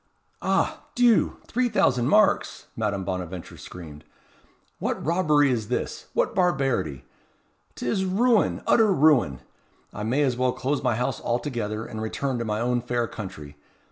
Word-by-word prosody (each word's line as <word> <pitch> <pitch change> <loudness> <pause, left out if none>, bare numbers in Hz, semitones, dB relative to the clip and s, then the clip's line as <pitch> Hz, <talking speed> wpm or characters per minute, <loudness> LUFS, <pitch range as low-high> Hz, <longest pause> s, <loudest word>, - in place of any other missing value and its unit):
"Ah! - - 0
Dieu! 240 -3 +3
three 245 +1 0
thousand 125 - +2
marks!" 210 +5 +2
Madame 100 -3 -1
Bonaventure 90 -1 -5
screamed. 80 -4 -10 0.8
"What - - -2
robbery 150 -4 +3
is 110 -4 -1
this! 125 - -3
what - - +1
barbarity! 135 - 0 0.7
'T - - -5
is 190 +11 0
ruin 220 +5 +2
utter 220 -3 +4
ruin! 135 - +3 0.5
I 105 - -6
may 125 +7 +1
as 130 -3 +1
well 125 0 +1
close 140 +2 -1
my 120 - +1
house 125 +2 -2
altogether, 115 -3 -2
and 110 - -6
return 125 +3 -2
to 115 - -2
my 105 -1 -1
own 120 0 +1
fair 120 0 -1
country. 85 -10 -8
125 Hz, 145 wpm, -25 LUFS, 105-150 Hz, 0.8 s, utter